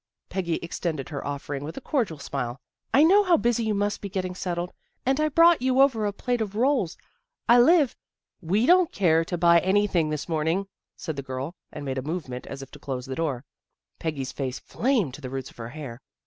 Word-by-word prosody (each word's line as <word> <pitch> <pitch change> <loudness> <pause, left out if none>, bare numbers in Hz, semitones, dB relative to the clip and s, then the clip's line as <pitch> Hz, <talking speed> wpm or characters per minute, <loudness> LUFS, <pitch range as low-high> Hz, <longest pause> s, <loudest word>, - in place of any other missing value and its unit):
" - - -58
Peggy 175 -4 -1
extended 165 -4 -3
her 145 -3 -5
offering 140 0 -4
with 155 +3 -7
a - - -2
cordial 240 - -1
smile. 130 -3 -4 0.2
" - - -66
I 285 - +6
know 390 +6 +7
how 355 -4 +4
busy 235 -3 +1
you 215 -1 +1
must 205 +1 -1
be 200 - -5
getting 185 -2 -3
settled, 175 -1 -3 0.3
and 265 +3 +2
I 310 0 +2
brought 330 +1 +5
you 260 0 +2
over 245 -6 +4
a - - 0
plate 245 +3 -2
of 205 -2 -3
rolls. 245 - +1 0.5
I 240 +1 +7
live 295 0 +5 0.3
" - - -54
We 215 +5 +4
don't 360 +2 +5
care 165 -4 +3
to 175 +1 -3
buy 170 0 +6
anything 190 -3 +2
this 150 -1 -3
morn 160 -2 -1
ing," 190 +4 0 0.3
said 160 -4 -5
the - - -2
girl, 130 +4 -5 0.2
and 145 - -7
made 135 -1 -2
a - - -3
movement 140 -4 -5
as 135 0 -6
if 135 - -13
to - - -12
close 130 -2 -4
the 135 - -5
door. 140 -4 -2 0.5
Peggy's 145 -5 -3
face 130 -2 -3
flamed 225 - 0
to 150 - -9
the 130 - -5
roots 135 0 -5
of - - -23
her 115 -1 -6
hair. 135 -3 -8
175 Hz, 230 wpm, -26 LUFS, 140-235 Hz, 0.5 s, know